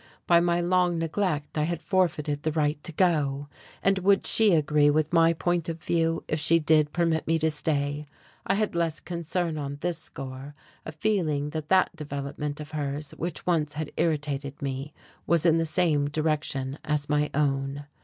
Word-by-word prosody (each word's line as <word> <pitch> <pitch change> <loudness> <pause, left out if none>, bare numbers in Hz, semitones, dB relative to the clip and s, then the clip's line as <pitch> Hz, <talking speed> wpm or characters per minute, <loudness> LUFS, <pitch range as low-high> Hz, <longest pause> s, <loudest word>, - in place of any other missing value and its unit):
By 170 -1 +5
my 175 0 +2
long 175 0 +2
neglect 165 -3 -1
I - - +2
had 170 0 -3
forfeited 160 -6 0
the 155 - -1
right 150 -1 0
to - - -3
go. 145 -5 +1 0.3
And 195 0 +3
would 195 +1 +3
she 220 -2 +4
agree 150 -1 +3
with 155 +1 +1
my 165 0 +5
point 170 0 -1
of 165 0 -4
view 165 0 0
if 155 - -1
she 165 +3 +3
did 155 -2 +3
permit 165 -2 0
me 165 +1 +3
to 160 0 +1
stay? 150 -1 -1 0.4
I 195 - +2
had 215 0 0
less 170 -2 -1
concern 170 -1 -3
on 140 0 -4
this 175 -1 -2
score, 135 +2 -8 0.3
a - - -4
feeling 155 -5 0
that 155 -1 -5
that 190 -1 +3
development 145 0 -5
of 150 0 -8
hers, 145 -1 -3
which 170 -1 -5
once 155 -4 +1
had 155 0 -4
irritated 145 -3 -1
me, 135 0 -4 0.4
was 170 -1 +3
in 165 -1 +5
the 165 - 0
same 155 -4 +1
direction 145 -3 -1
as 150 -1 -1
my 150 0 +1
own.... 140 -1 0
155 Hz, 180 wpm, -27 LUFS, 145-170 Hz, 0.4 s, By